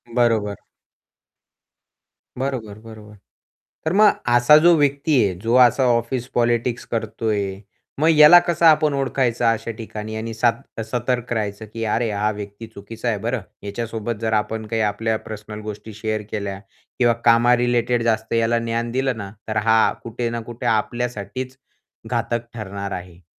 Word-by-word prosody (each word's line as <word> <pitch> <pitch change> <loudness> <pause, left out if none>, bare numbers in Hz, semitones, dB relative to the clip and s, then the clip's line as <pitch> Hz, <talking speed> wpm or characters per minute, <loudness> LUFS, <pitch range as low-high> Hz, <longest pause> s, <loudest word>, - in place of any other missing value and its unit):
बरोबर. 110 -4 +1 1.8
बरोबर, 125 -6 -4
बरोबर. 110 -1 -13 0.7
तर 160 - 0
मग 210 0 +6 0.2
असा 120 +5 +7
जो 170 +2 +6
व्यक्ती 145 +1 +1
आहे, 95 - 0
जो 115 +3 0
असा 130 +2 0
ऑफिस 120 +2 -2
पॉलिटिक्स 120 0 0
करतोय. 105 -3 -2 0.4
मग 155 - +3
ह्याला 155 +2 +8
कसं 170 0 +1
आपण 155 -2 +5
ओळखायचं, 130 -3 0
अशा 115 0 +1
ठिकाणी? 110 -1 -6
आणि 115 +1 -4
सात 115 0 -1
सतर्क 120 +1 -2
राहायचं 105 -1 -3
की 115 0 -4
अरे, 115 +1 0
हा 105 +1 0
व्यक्ती 105 +2 -8
चुकीचा 110 +2 -8
आहे 105 - 0
बरं. 115 +2 -2 0.2
ह्याच्यासोबत 115 +2 -4
जर 110 0 -1
आपण 110 +1 -1
काही 110 0 -1
आपल्या 110 +1 0
पर्सनल 105 0 -8
गोष्टी 105 +1 -8
शेअर 110 0 -3
केल्या 100 -2 -4 0.4
किंवा 120 -1 +4
कामा 120 +1 +5
रिलेटेड 120 0 +1
जास्त 110 -1 0
याला 115 0 +2
ज्ञान 115 0 -2
दिलं 130 -1 -1
ना, 100 -2 -7 0.2
तर 110 0 -2
हा, 110 +1 +4
कुठे 115 +1 -3
ना 115 - -3
कुठे 120 +1 -8
आपल्यासाठीच 120 +2 -2 0.5
घातक 120 0 -1
ठरणार 100 -3 -6
आहे. 90 -1 -8
115 Hz, 150 wpm, -21 LUFS, 105-120 Hz, 1.8 s, ह्याला